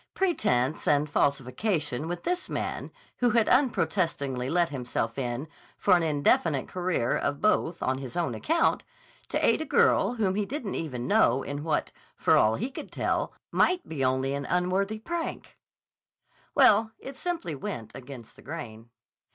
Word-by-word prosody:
Pretense 150 - +1
and 145 0 +3
falsification 145 - 0
with 175 0 -4
this 360 +1 -2
man - - -3 0.3
who 245 - +3
had 230 -1 +3
unprotestingly 165 - +1
let 170 +1 +2
himself 125 -4 -3
in 125 +3 -3 0.3
for 190 - +4
an 175 - +2
indefinite 150 -2 +2
career 180 -9 0
of 140 0 -1
both 180 -5 +1
on 130 0 0
his 130 0 -7
own 175 - 0
account, 330 +2 +1 0.5
to - - +1
aid - - +3
a - - -2
girl 235 -5 +3
whom 205 -5 +1
he 210 +2 0
didn't 230 -1 -4
even 125 -7 -4
know 130 +1 +3
in 145 +1 -5
what, 160 - -1 0.3
for - - +4
all 110 +1 +4
he 245 +6 -3
could - - -8
tell, - - -1 0.2
might 365 0 +2
be 145 -4 -3
only 130 +1 +1
an 140 0 -3
unworthy 185 +4 0
prank—well, 255 -5 -1
it 270 +1 -9
simply 330 - -3
went 120 -5 -6
against 125 -3 -10
the - - -16
grain. 120 -7 -8
160 Hz, 155 wpm, -27 LUFS, 130-215 Hz, 0.5 s, for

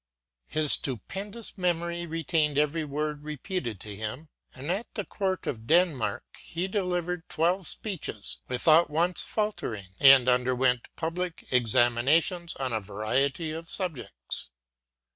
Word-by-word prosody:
His 155 -2 +3
stupendous 195 - +1
memory 170 -1 -1
retained 160 -2 0
every 150 +2 +1
word 150 0 -3
repeated 150 - -4
to 105 -2 -6
him; 110 +9 -6 0.2
and 140 +6 -5
at 200 +6 -3
the 205 -4 -3
court 190 -2 -2
of 115 -3 -5
Denmark 165 - +2 0.2
he 175 +3 -4
delivered 180 -3 -2
twelve 175 +2 +2
speeches 170 - -1
without 155 +6 +4
once 170 +4 +1
falter 210 - -2
ing; 95 -3 -10
and 135 -2 +8
underwent 125 0 +2
public 175 +1 -4
examinations 125 - +2
on 130 -2 -3
a 110 - -1
variety 135 - -1
of 165 +1 -7
subjects. 145 - -3
155 Hz, 125 wpm, -27 LUFS, 125-175 Hz, 0.2 s, and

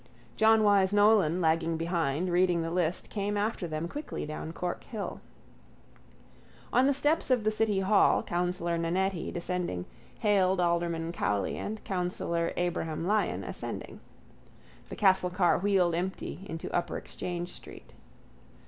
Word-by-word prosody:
John 220 0 +5
Wyse 200 -2 +4
Nolan, 205 -5 +4
lagging 165 0 +1
behind, 165 0 -1
reading 175 -1 +3
the 165 - -3
list, 175 -1 -1
came 205 0 -1
after 205 -3 -1
them 155 +1 -3
quickly 295 - -5
down 155 +1 -5
Cork 175 +1 -4
hill. 215 -4 -5 1.5
On 255 +2 +5
the - - +4
steps 295 +3 +1
of 250 -4 +3
the 215 - +2
City 215 -2 +1
hall 195 +2 +4
Councillor 175 -1 -1
Nannetti, 180 +2 -1
descending, 175 - -3 0.3
hailed 190 -3 +2
Alderman 170 -1 0
Cowley 100 - -1
and 215 +1 -5
Councillor 175 -2 -1
Abraham 165 -2 -2
Lyon 210 +3 +1
ascending. - - -6 0.9
The - - -6
castle 190 -3 +3
car 180 -1 +2
wheeled 190 -3 +2
empty 185 +2 -4
into 165 0 -5
upper 175 - -1
Exchange 175 0 -5
street. - - -11
180 Hz, 135 wpm, -29 LUFS, 170-205 Hz, 1.5 s, John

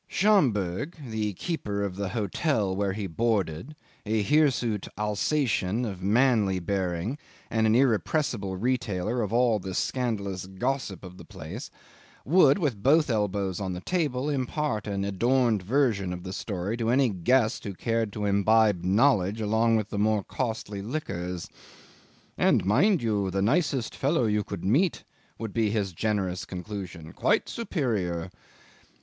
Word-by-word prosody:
Schomberg, 140 - +2 0.2
the 105 -2 -1
keeper 100 - -3
of 100 -2 -3
the 100 -1 -3
hotel 105 - 0
where 100 -1 0
he 100 0 -4
boarded, 100 - -1 0.3
a 110 0 0
hirsute 125 -6 +2
Alsatian 105 0 0
of 95 -5 -5
manly 105 -2 +3
bearing 95 - -2 0.3
and 110 0 +2
an 110 - +4
irrepressible 115 - +1
retailer 115 -1 -1
of 105 -2 -2
all 120 -2 +3
the 95 -1 -6
scandalous 100 -8 -2
gossip 100 0 -3
of 90 0 -10
the - - -9
place, - - -8 0.6
would, 155 -1 +5
with 140 - -1
both 150 +2 +4
elbows 100 -4 -1
on 95 -2 -3
the 90 - -5
table, 145 - -1
impart 135 -5 -1
an 100 -1 -2
adorned 115 +2 +2
version 105 -3 +1
of 90 0 -7
the 95 0 -6
story 100 0 -3
to 115 -1 -1
any 130 +1 +4
guest 110 +5 +1
who 100 -3 -5
cared 115 +1 -1
to 105 0 -3
imbibe 100 -1 +3
knowledge 100 0 +3
along 110 +2 +2
with 110 -1 -1
the 100 - -2
more 105 -1 +2
costly 110 -4 -4
liquors. 90 - -4 0.9
"And, - - +3
mind 150 - +3
you, 105 -4 0
the 95 +1 0
nicest 135 - +1
fellow 140 -2 +1
you 105 -1 +1
could 100 -4 -6
meet," 150 - +2 0.3
would 110 -3 -5
be 110 -2 +1
his 100 -3 -1
generous 95 -1 -1
conclusion; 90 -4 -7
"quite - - +1
superior." 105 - -2
105 Hz, 145 wpm, -27 LUFS, 95-125 Hz, 0.9 s, would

